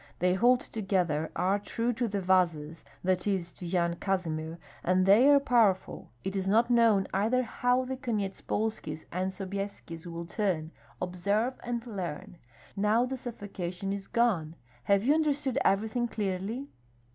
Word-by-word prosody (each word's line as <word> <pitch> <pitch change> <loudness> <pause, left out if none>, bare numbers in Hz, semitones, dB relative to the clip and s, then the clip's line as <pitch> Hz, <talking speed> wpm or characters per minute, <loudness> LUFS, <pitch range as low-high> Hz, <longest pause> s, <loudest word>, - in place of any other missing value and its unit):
They 180 +1 +2
hold 245 +6 +4
together, 180 - -1
are 190 +4 +1
true 230 +4 -1
to 235 +1 -1
the 200 -2 -2
Vazas 170 -4 +1 0.2
(that 185 +1 +1
is, 185 -4 -1
to 180 - -7
Yan 170 -1 0
Kazimir) 165 -4 -2 0.3
and 185 +1 +3
they 215 +8 +7
are 285 -1 +7
powerful 230 -8 +2
It 190 - -3
is 190 -1 -1
not 230 +5 +3
known 225 -5 +4
either 225 +6 +2
how 245 +2 +1
the 260 +1 -3
Konyetspolskis 210 - -3
and 185 +2 -1
Sobyeskis 190 -3 -6
will 170 0 -5
turn 170 -5 -1 0.3
Observe 200 +7 0
and 240 -1 -3
learn 180 -6 -6 0.4
Now 210 +4 +3
the 265 +1 -3
suffocation 195 -6 -5
is 200 -1 -6
gone. 185 -10 +1 0.3
Have 200 0 +3
you 275 +5 +4
understood 290 -4 +1
everything 220 +4 +1
clearly?" 210 +5 -3
195 Hz, 145 wpm, -29 LUFS, 180-235 Hz, 0.4 s, they